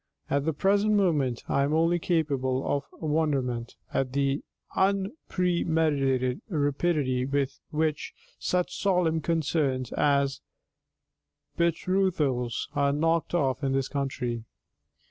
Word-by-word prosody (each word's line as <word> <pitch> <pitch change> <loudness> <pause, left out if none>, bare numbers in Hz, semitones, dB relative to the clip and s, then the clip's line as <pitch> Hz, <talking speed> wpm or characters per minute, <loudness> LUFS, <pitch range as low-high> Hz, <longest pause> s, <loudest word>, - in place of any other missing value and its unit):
At 140 0 +1
the 160 - +2
present 200 +6 +2
moment 150 - +1
I 140 - +1
am 140 +2 +1
only 165 +2 +3
capable 140 -6 0
of 140 -1 0
wonderment 140 -7 -1 0.2
at 130 -1 0
the 140 0 +1 0.3
unpremeditated 165 - +1
rapidity 145 -4 +1
with 140 0 -1
which 155 0 -1 0.3
such 180 0 -1
solemn 180 -5 +2
concerns 150 -5 0
as 140 -1 +1 1.1
betrothals 165 -8 0
are 140 -1 +2
knocked 165 +3 +1
off 135 -4 0
in 135 -1 +1
this 135 -1 +1
country. 130 -5 -3
145 Hz, 105 wpm, -27 LUFS, 135-170 Hz, 1.1 s, only